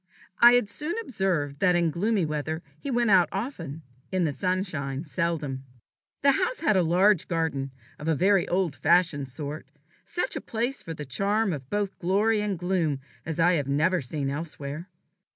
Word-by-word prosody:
I 240 Hz, +1 st, +9 dB
had 245 Hz, -4 st, +3 dB
soon 300 Hz, -, -2 dB
observed 180 Hz, -, -1 dB
that 180 Hz, -2 st, +4 dB
in 170 Hz, -2 st, +2 dB
gloomy 200 Hz, +2 st, +1 dB
weather 155 Hz, +2 st, -3 dB, 0.2 s
he 280 Hz, -, -5 dB
went 240 Hz, -3 st, +2 dB
out 185 Hz, -3 st, +5 dB
often, 170 Hz, -, -5 dB, 0.3 s
in 185 Hz, -1 st, +1 dB
the 155 Hz, -, +1 dB
sunshine 165 Hz, -6 st, -2 dB
seldom. 155 Hz, -5 st, -2 dB, 0.6 s
The 280 Hz, -, +7 dB
house 380 Hz, -, -1 dB
had 310 Hz, -10 st, +3 dB
a 185 Hz, -, +4 dB
large 180 Hz, +3 st, +3 dB
garden, 160 Hz, -5 st, -1 dB, 0.3 s
of 150 Hz, -, -6 dB
a 160 Hz, -, +3 dB
very 190 Hz, +3 st, +3 dB
old 180 Hz, -5 st, 0 dB
fashioned 160 Hz, -6 st, +2 dB
sort, 145 Hz, +2 st, -6 dB, 0.4 s
such 355 Hz, -, -2 dB
a -, -, -3 dB
place 235 Hz, +2 st, -2 dB
for 165 Hz, -4 st, -6 dB
the 150 Hz, -, -6 dB
charm 200 Hz, -, +1 dB
of 135 Hz, -3 st, -7 dB
both 205 Hz, -1 st, -2 dB
glory 210 Hz, +5 st, +2 dB
and 205 Hz, -3 st, -1 dB
gloom 170 Hz, -5 st, 0 dB, 0.3 s
as 160 Hz, 0 st, -3 dB
I 175 Hz, +2 st, +5 dB
have 145 Hz, -5 st, 0 dB
never 160 Hz, +6 st, +2 dB
seen 140 Hz, +2 st, -3 dB
elsewhere. 150 Hz, +2 st, -5 dB
175 Hz, 175 wpm, -26 LUFS, 150-200 Hz, 0.6 s, I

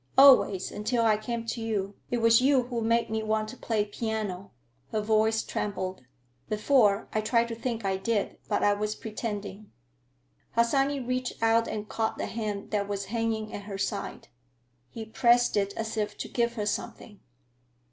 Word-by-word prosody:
"Always, 260 Hz, -9 st, +6 dB
until 230 Hz, +3 st, 0 dB
I 220 Hz, -1 st, +5 dB
came 230 Hz, +2 st, -4 dB
to 230 Hz, 0 st, -3 dB
you. 205 Hz, -3 st, -2 dB, 0.2 s
It 240 Hz, -1 st, -1 dB
was 230 Hz, +1 st, +6 dB
you 265 Hz, -1 st, +4 dB
who 240 Hz, -1 st, -3 dB
made 230 Hz, 0 st, +1 dB
me 220 Hz, 0 st, 0 dB
want 215 Hz, 0 st, -1 dB
to 255 Hz, -, -8 dB
play 220 Hz, -4 st, -1 dB
piano." 210 Hz, -3 st, -4 dB, 0.4 s
Her 220 Hz, -, 0 dB
voice 220 Hz, +1 st, +2 dB
trembled. 185 Hz, -7 st, -4 dB, 0.4 s
"Before, 215 Hz, -1 st, +3 dB
I 215 Hz, -, +1 dB
tried 230 Hz, +2 st, +2 dB
to 230 Hz, -, -4 dB
think 230 Hz, -2 st, -3 dB
I 190 Hz, -1 st, +1 dB
did, 210 Hz, +1 st, -1 dB
but -, -, +1 dB
I 205 Hz, -, +5 dB
was 210 Hz, +1 st, -2 dB
pretending." 210 Hz, -2 st, -6 dB, 0.8 s
Harsanyi 270 Hz, +4 st, +2 dB
reached 255 Hz, 0 st, -2 dB
out 225 Hz, 0 st, +4 dB
and 210 Hz, -1 st, -4 dB
caught 220 Hz, 0 st, -2 dB
the -, -, -2 dB
hand 210 Hz, -3 st, -4 dB
that 205 Hz, -2 st, 0 dB
was 200 Hz, -1 st, -3 dB
hanging 225 Hz, -2 st, -1 dB
at 205 Hz, -, -6 dB
her 200 Hz, -2 st, -5 dB
side. 195 Hz, -, -4 dB, 0.6 s
He 225 Hz, -1 st, -7 dB
pressed 240 Hz, +2 st, +3 dB
it 200 Hz, -1 st, +1 dB
as 225 Hz, 0 st, -3 dB
if 210 Hz, -1 st, -2 dB
to -, -, -5 dB
give 235 Hz, -1 st, 0 dB
her 210 Hz, -3 st, -2 dB
something. 210 Hz, -1 st, -4 dB
220 Hz, 175 wpm, -28 LUFS, 210-235 Hz, 0.8 s, Always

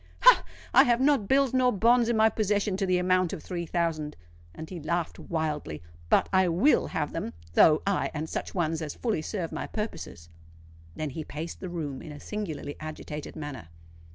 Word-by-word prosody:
ha! -, -, +8 dB, 0.3 s
I -, -, +8 dB
have 240 Hz, -1 st, +3 dB
not 270 Hz, -6 st, +3 dB
bills 270 Hz, 0 st, +3 dB
nor 255 Hz, -1 st, +4 dB
bonds 235 Hz, +3 st, +4 dB
in 235 Hz, -, +2 dB
my 220 Hz, 0 st, +6 dB
possession 210 Hz, -2 st, 0 dB
to 195 Hz, -1 st, -1 dB
the 185 Hz, 0 st, +3 dB
amount 185 Hz, -1 st, +2 dB
of -, -, -6 dB
three 170 Hz, -2 st, -4 dB
thousand!"—and 150 Hz, -, -4 dB
he 180 Hz, -, -5 dB
laughed 170 Hz, +2 st, -2 dB
wildly. 150 Hz, -, -3 dB, 0.3 s
"But -, -, +4 dB
I 190 Hz, -1 st, +5 dB
will 185 Hz, -, +3 dB
have 150 Hz, -2 st, -2 dB
them, 165 Hz, -8 st, -4 dB, 0.2 s
though—aye, 165 Hz, -, +4 dB
and 155 Hz, +1 st, -4 dB
such -, -, -5 dB
ones 165 Hz, -2 st, 0 dB
as 150 Hz, -2 st, -4 dB
shall -, -, -21 dB
fully 225 Hz, -10 st, 0 dB
serve 170 Hz, 0 st, -4 dB
my -, -, -4 dB
purposes." 210 Hz, -, -6 dB, 0.7 s
Then 155 Hz, -2 st, -3 dB
he 155 Hz, +4 st, -5 dB
paced 155 Hz, +3 st, -6 dB
the 185 Hz, -, -6 dB
room 150 Hz, -6 st, -4 dB
in 155 Hz, -, -9 dB
a 145 Hz, -, -9 dB
singularly 160 Hz, -9 st, -5 dB
agitated 155 Hz, -1 st, -7 dB
manner. 145 Hz, -, -7 dB
170 Hz, 185 wpm, -28 LUFS, 150-210 Hz, 0.7 s, ha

